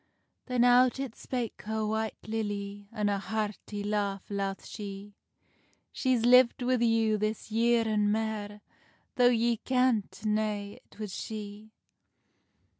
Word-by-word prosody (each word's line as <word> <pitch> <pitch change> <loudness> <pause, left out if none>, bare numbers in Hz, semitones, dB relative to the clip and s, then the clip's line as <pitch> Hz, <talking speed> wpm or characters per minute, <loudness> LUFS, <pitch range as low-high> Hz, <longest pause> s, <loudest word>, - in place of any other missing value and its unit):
Then 250 -2 +2
out 245 +1 +5
it 270 -4 -4
spake 245 -3 -4
her 220 0 -1
White 220 +1 -2
Lilly, 205 -2 -4
An 210 -3 -1
a 200 -1 +1
hearty 210 -1 -4
laugh 205 -1 -2
laugh 195 -1 -3
she: 205 -1 -8 0.8
"She's 255 -3 +1
lived 250 0 +6
wi 250 -1 +1
you 225 -2 +2
this 215 +1 -3
year 230 +1 +3
an 210 -1 +2
mair, 210 -1 -2 0.6
Tho 245 -1 +6
ye 235 -1 +2
kenntna 215 -4 0
it - - -22
was 210 -3 -5
she." 210 0 -7
215 Hz, 125 wpm, -29 LUFS, 205-235 Hz, 0.8 s, lived